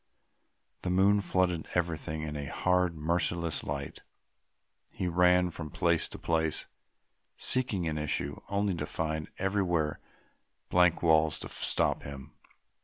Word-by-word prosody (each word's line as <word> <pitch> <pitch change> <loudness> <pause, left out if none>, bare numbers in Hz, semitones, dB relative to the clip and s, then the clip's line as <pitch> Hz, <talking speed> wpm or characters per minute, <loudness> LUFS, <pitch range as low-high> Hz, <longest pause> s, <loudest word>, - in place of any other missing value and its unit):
The 90 - -3
moon 100 +3 +4
flooded 90 -4 0
everything 80 -3 -1
in 75 -1 -4
a 70 -1 -4
hard, 90 -2 +1
merciless 85 0 -1
light; 70 -1 -5 0.9
he 90 - -3
ran 90 +1 +4
from 80 -1 -6
place 85 +1 +1
to - - -8
place 80 -2 0 0.7
seeking 105 -9 +1
an 75 -1 -1
issue, 70 -1 -2
only 100 0 +1
to 75 -3 -3
find 80 -1 -2
everywhere 90 -6 0 0.7
blank 90 -1 +4
walls 80 -1 +4
to - - -6
stop - - +1
him. 70 -2 -9
85 Hz, 125 wpm, -30 LUFS, 75-90 Hz, 0.9 s, moon